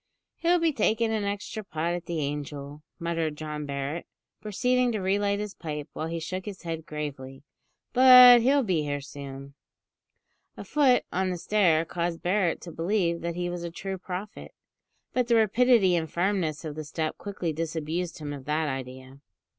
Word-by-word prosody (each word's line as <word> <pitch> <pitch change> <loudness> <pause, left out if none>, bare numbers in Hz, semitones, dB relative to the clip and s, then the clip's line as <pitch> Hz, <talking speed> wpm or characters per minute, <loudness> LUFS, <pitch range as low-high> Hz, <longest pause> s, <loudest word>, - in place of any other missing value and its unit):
"He'll 345 +1 +3
be 330 -2 +1
taking 225 -2 +1
an 215 -2 -1
extra 205 +2 -4
pot 165 -2 -2
at 175 -1 -5
the 170 - -2
`Angel,'" 145 0 -4 0.2
muttered 165 -3 -2
John 150 -1 -5
Barret, 140 +4 -4 0.3
proceeding 250 +4 +1
to 215 - -1
re 190 +1 +1
light 200 0 +1
his 210 -1 -4
pipe, 150 -3 -6
while 160 - -4
he 165 0 -3
shook 185 +3 -5
his 200 -3 -8
head 165 -2 -5
gravely; 135 -3 -6 0.5
"but 250 -1 +9
he'll 275 +3 +3
be 180 -8 +1
here 145 -1 -2
soon." 140 -1 -9 1.0
A - - -6
foot 275 -4 +3
on 185 +1 0
the 180 - -2
stair 170 -4 +2
caused 170 0 -3
Barret 180 -1 +1
to 170 - -8
believe 170 0 0
that 170 0 -3
he 175 0 -2
was 175 0 -4
a 170 - -3
true 190 +3 -5
prophet; 190 +3 -7 0.6
but 250 -2 +1
the 235 - +3
rapidity 225 -3 +4
and 160 -2 -1
firmness 170 -4 -1
of 155 - -4
the 155 +1 -6
step 155 +1 -3
quickly 190 -5 -3
disabused 165 +2 -3
him 145 -2 -5
of 135 -2 -9
that 155 +1 0
idea. 130 0 -6
170 Hz, 180 wpm, -27 LUFS, 150-205 Hz, 1.0 s, but